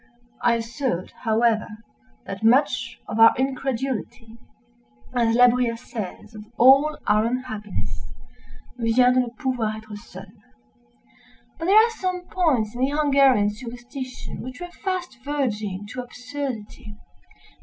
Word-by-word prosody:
I 235 Hz, -, +3 dB
assert, 230 Hz, -4 st, -3 dB
however, 225 Hz, -1 st, +1 dB, 0.6 s
that 195 Hz, +2 st, -7 dB
much 255 Hz, +3 st, +2 dB
of 220 Hz, -, -3 dB
our 225 Hz, 0 st, +8 dB
incredulity—as 235 Hz, -, -4 dB
La 245 Hz, +1 st, +7 dB
Bruyère 245 Hz, -1 st, +2 dB
says 220 Hz, -2 st, -7 dB
of 210 Hz, 0 st, -10 dB
all 275 Hz, +5 st, +6 dB
our 210 Hz, +1 st, +3 dB
unhappiness—"vient 240 Hz, +1 st, -2 dB
de 255 Hz, -, +4 dB
ne 250 Hz, -, -3 dB
pouvoir 250 Hz, -7 st, -1 dB
être 215 Hz, -1 st, -10 dB
seuls." 205 Hz, -, -11 dB
{*1} -, -, -26 dB, 1.3 s
But 330 Hz, -, -3 dB
there 385 Hz, +4 st, +4 dB
are 445 Hz, +2 st, +7 dB
some 370 Hz, -5 st, -3 dB
points 265 Hz, -, +1 dB
in 245 Hz, -, -5 dB
the 265 Hz, -, +3 dB
Hungarian 275 Hz, -7 st, +4 dB
superstition 245 Hz, +3 st, -8 dB
which 255 Hz, +3 st, -8 dB
were 355 Hz, 0 st, -7 dB
fast 360 Hz, -9 st, -3 dB
verging 215 Hz, -9 st, -2 dB
to 255 Hz, -, -4 dB
absurdity. 250 Hz, -4 st, -7 dB
245 Hz, 125 wpm, -24 LUFS, 220-270 Hz, 1.3 s, our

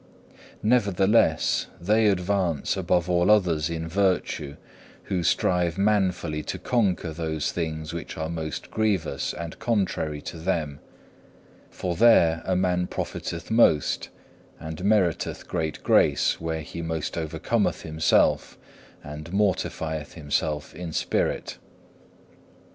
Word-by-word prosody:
Nevertheless 105 Hz, -2 st, +3 dB
they 105 Hz, +5 st, +3 dB
advance 90 Hz, -5 st, 0 dB
above 90 Hz, -1 st, +1 dB
all 90 Hz, 0 st, +2 dB
others 85 Hz, -7 st, +3 dB
in 80 Hz, -1 st, -4 dB
virtue 90 Hz, -5 st, 0 dB, 0.5 s
who 90 Hz, -2 st, -2 dB
strive 90 Hz, +1 st, +1 dB
manfully 95 Hz, -6 st, +1 dB
to -, -, -5 dB
conquer 95 Hz, -9 st, 0 dB
those 80 Hz, -2 st, -2 dB
things 80 Hz, -2 st, -4 dB
which 85 Hz, -, -6 dB
are 80 Hz, 0 st, -2 dB
most 80 Hz, -2 st, -5 dB
grievous 105 Hz, -7 st, 0 dB
and 85 Hz, -1 st, -7 dB
contrary 95 Hz, -9 st, -1 dB
to -, -, -7 dB
them, 80 Hz, -5 st, -2 dB, 0.9 s
for 90 Hz, -1 st, -3 dB
there 85 Hz, -7 st, +5 dB
a 95 Hz, -, +1 dB
man 90 Hz, -1 st, +1 dB
profiteth 85 Hz, +4 st, -5 dB
most 110 Hz, -, +3 dB, 0.5 s
and 80 Hz, +3 st, -7 dB
meriteth 100 Hz, -5 st, +1 dB
greater 80 Hz, -1 st, -3 dB
grace -, -, +3 dB
where 80 Hz, -1 st, -2 dB
he 85 Hz, +2 st, -7 dB
most 80 Hz, -2 st, -3 dB
overcometh 80 Hz, -2 st, -1 dB
himself 80 Hz, 0 st, +2 dB, 0.5 s
and 75 Hz, +3 st, -8 dB
mortifieth 80 Hz, -6 st, -1 dB
himself 75 Hz, -1 st, -2 dB
in 90 Hz, -2 st, -6 dB
spirit. -, -, -1 dB
85 Hz, 115 wpm, -25 LUFS, 80-95 Hz, 0.9 s, there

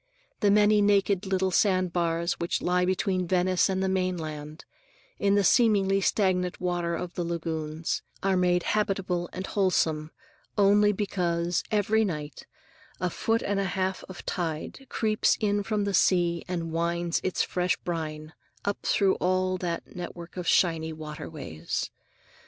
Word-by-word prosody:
The 205 Hz, -, +3 dB
many 210 Hz, +1 st, +5 dB
naked 200 Hz, -2 st, +2 dB
little 190 Hz, 0 st, +1 dB
sandbars 175 Hz, -3 st, +1 dB
which 170 Hz, -, -1 dB
lie 180 Hz, 0 st, +2 dB
between 185 Hz, -1 st, 0 dB
Venice 185 Hz, +1 st, +2 dB
and 190 Hz, 0 st, 0 dB
the -, -, +1 dB
mainland, 160 Hz, -5 st, -3 dB, 0.5 s
in 200 Hz, 0 st, +3 dB
the 205 Hz, -, +3 dB
seemingly 195 Hz, -3 st, +4 dB
stagnant 180 Hz, -3 st, +1 dB
water 175 Hz, -1 st, -1 dB
of 175 Hz, +1 st, -5 dB
the 175 Hz, -, -2 dB
lagoons, 160 Hz, -2 st, -3 dB, 0.2 s
are 195 Hz, -1 st, +2 dB
made 180 Hz, -1 st, +2 dB
habitable 190 Hz, -4 st, -1 dB
and 185 Hz, +1 st, -5 dB
wholesome 160 Hz, -7 st, +1 dB, 0.5 s
only 205 Hz, +1 st, +5 dB
because, 175 Hz, -4 st, -1 dB
every 215 Hz, +1 st, +2 dB
night, 150 Hz, -, -5 dB, 0.5 s
a 180 Hz, 0 st, -1 dB
foot 225 Hz, +6 st, 0 dB
and 200 Hz, -1 st, 0 dB
a 195 Hz, -, 0 dB
half 190 Hz, 0 st, -1 dB
of 185 Hz, -, -9 dB
tide 170 Hz, -, -4 dB
creeps 215 Hz, -1 st, +2 dB
in 205 Hz, -1 st, +1 dB
from 210 Hz, 0 st, -1 dB
the 200 Hz, 0 st, -1 dB
sea 175 Hz, -2 st, +3 dB
and 170 Hz, -2 st, -3 dB
winds 170 Hz, +1 st, 0 dB
its 185 Hz, -, 0 dB
fresh 180 Hz, -1 st, 0 dB
brine 155 Hz, -2 st, -5 dB, 0.3 s
up 200 Hz, -, -1 dB
through 195 Hz, -2 st, +3 dB
all 185 Hz, 0 st, +1 dB
that 170 Hz, -2 st, -4 dB
network 175 Hz, -1 st, -7 dB
of 180 Hz, -1 st, -5 dB
shining 160 Hz, -3 st, +2 dB
waterways. 150 Hz, -, -5 dB
180 Hz, 145 wpm, -27 LUFS, 170-195 Hz, 0.5 s, many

